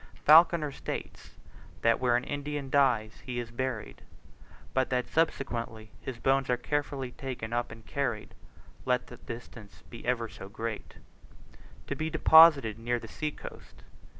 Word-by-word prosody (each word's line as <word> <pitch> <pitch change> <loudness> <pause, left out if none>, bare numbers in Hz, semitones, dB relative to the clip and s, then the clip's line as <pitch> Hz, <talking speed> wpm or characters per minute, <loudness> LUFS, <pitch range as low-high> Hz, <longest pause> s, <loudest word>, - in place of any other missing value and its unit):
Falconer 160 -1 +6
states, - - -7 0.5
that 115 0 +4
where 125 -2 +2
an 125 - -3
Indian 145 -1 -4
dies 110 - +2
he 125 -1 -5
is 120 -1 -6
buried, 125 -2 -4 0.7
but 130 -1 +1
that 125 -1 0
subsequently 115 -8 -2
his 130 -3 -6
bones 135 +2 +1
are 125 - +2
carefully 140 -1 -2
taken 125 -4 -6
up 120 0 -1
and 115 -1 -12
carried, 125 -7 -3 0.5
let 125 -1 +1
the 125 - -12
distance 115 -3 -10
be 115 - -9
ever 120 -2 0
so 95 -3 -11
great, 110 +1 -6 0.9
to - - -3
be 155 0 -2
deposited 155 -8 +6
near 120 +1 0
the - - -8
sea 155 - -3
coast. - - -12
125 Hz, 150 wpm, -29 LUFS, 115-140 Hz, 0.9 s, Falconer